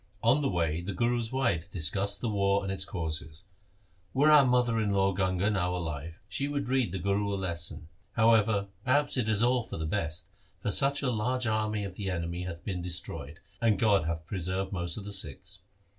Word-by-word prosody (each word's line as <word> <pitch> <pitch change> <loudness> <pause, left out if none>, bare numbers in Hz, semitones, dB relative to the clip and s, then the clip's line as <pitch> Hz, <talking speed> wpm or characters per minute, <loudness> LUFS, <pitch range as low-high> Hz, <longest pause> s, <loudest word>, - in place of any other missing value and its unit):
On 125 +6 +4
the 140 - +1
way 85 -3 0
the 95 +2 -5
Guru's 120 -1 0
wives 120 -11 0
discussed 95 +4 +1
the 120 - -1
war 100 -1 +2
and 95 - -2
its 95 0 0
causes 80 -2 -4 0.2
— 100 +1 -37
' 90 0 -37
Were 145 +3 +5
our 150 -2 +8
mother 125 -3 +2
in 105 - 0
law 100 -1 +2
Ganga 95 +2 +1
now 90 -3 0
alive, 80 -2 -4
she 140 +7 -2
would 145 -2 -2
read 130 -7 +1
the 95 - -3
Guru 100 +2 0
a - - 0
lesson. 85 -4 -2 0.3
However, 110 -3 +3
perhaps 145 +3 +2
it 120 -4 0
is 110 0 +3
all 125 +1 +3
for 110 - -7
the 80 - -3
best, 85 0 -2 0.3
for 105 - -2
such 140 +5 +3
a 130 - +1
large 125 +3 0
army 110 -1 0
of 95 -2 -7
the 100 -2 -3
enemy 85 0 -3
hath 85 -1 -7
been 90 -3 -3
destroyed, 85 -3 -5 0.2
and 110 -4 +3
God 100 -5 +3
hath 85 0 -3
preserved 95 +1 -3
most 85 -3 -2
of 105 - -6
the 100 - -3
Sikhs.' 80 -8 -3
100 Hz, 210 wpm, -29 LUFS, 85-115 Hz, 0.3 s, our